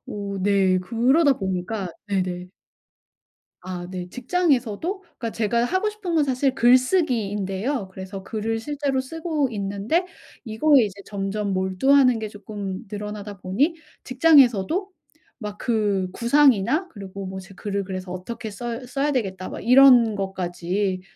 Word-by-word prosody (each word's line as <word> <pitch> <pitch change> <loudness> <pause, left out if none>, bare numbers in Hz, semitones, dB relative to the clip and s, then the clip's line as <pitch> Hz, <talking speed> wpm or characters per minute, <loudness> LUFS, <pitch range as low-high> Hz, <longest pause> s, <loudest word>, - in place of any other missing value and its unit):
오 200 -1 -5
네. 195 -2 +3
그러다 255 - +3
보니까 190 +1 -3 0.2
네네. 180 -2 -2 1.1
아 180 -1 -6
네. 180 -1 -6
직장에서도 280 - 0
그러니까 260 -10 -7
제가 230 +2 0
하고 375 +9 0
싶은 415 -5 -4
건 305 - +4
사실 265 0 0
글쓰기인데요 240 - +1
그래서 190 +1 -7
글을 225 +2 -2
실제로 280 +1 -2
쓰고 310 0 -2
있는데 205 - -1 0.4
이거에 260 +5 +4
이제 200 -1 -7
점점 200 0 -3
몰두하는 240 +7 +3
게 220 -1 -4
쪼끔 205 -2 -6
늘어나다 210 -1 -6
보니 210 - 0 0.3
직장에서도 280 - +4 0.5
막 210 -3 -7
그 205 -5 0
구상이나 265 - +3
그리고 195 - -8
뭐 190 0 -6
제 190 +1 -14
글을 200 +1 -3
그래서 185 -1 -6
어떻게 220 +5 -6
써 235 +4 -5
써야 275 +4 -1
되겠다 190 -8 -2
막 - - -7
이런 250 -3 +6
것까지 185 0 -2
215 Hz, 300 characters per minute, -23 LUFS, 195-265 Hz, 1.1 s, 이런